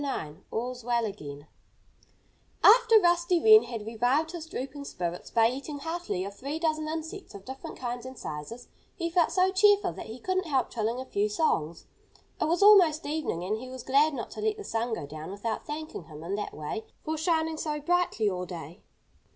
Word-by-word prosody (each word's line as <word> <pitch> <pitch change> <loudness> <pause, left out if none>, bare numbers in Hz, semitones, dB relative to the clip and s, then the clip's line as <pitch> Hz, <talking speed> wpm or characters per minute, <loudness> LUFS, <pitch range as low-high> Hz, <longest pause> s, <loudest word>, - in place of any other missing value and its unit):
IX 155 - -4
ALL'S 245 +1 -4
WELL 235 -1 +1
AGAIN 145 -9 -7 1.2
After 455 0 +8
Rusty 345 -1 +3
Wren 435 +3 +8
had 225 -4 -6
revived 245 +8 +1
his 335 -2 -7
drooping 280 -1 -6
spirits 175 -7 -4
by 225 -1 +4
eating 275 +4 -4
heartily 325 - -3
of 200 - -6
three 280 +7 -4
dozen 310 -1 0
insects 320 - -6
of 195 -1 -10
different 265 +1 -8
kinds 245 -1 -4
and 260 -1 -10
sizes, 155 +12 -7 0.3
he 335 -3 -3
felt 345 -1 +3
so 370 +1 +3
cheerful 410 +1 +4
that - - -8
he 220 +2 -7
couldn't 370 +6 -1
help 270 -4 0
trilling 230 +1 -1
a 260 - -5
few 210 -3 0
songs. 170 - 0 0.6
It - - +3
was 340 +5 +2
almost 360 -7 +7
evening; 295 - -2
and 210 +4 -1
he 255 +2 -8
was 255 -1 -8
glad 285 +3 +3
not 235 - -5
to - - -7
let 430 0 0
the 415 - -7
sun 230 - -1
go 145 - -6
down 155 +3 -8
without 205 +3 -4
thanking 305 - -6
him 155 -1 -11
in 175 +4 -4
that 205 +1 -3
way 155 +9 -4 0.2
for 315 - -2
shining 320 0 0
so 300 -1 -2
brightly 345 -8 +1
all 180 -2 -2
day. 170 0 -8
265 Hz, 195 wpm, -28 LUFS, 210-325 Hz, 1.2 s, After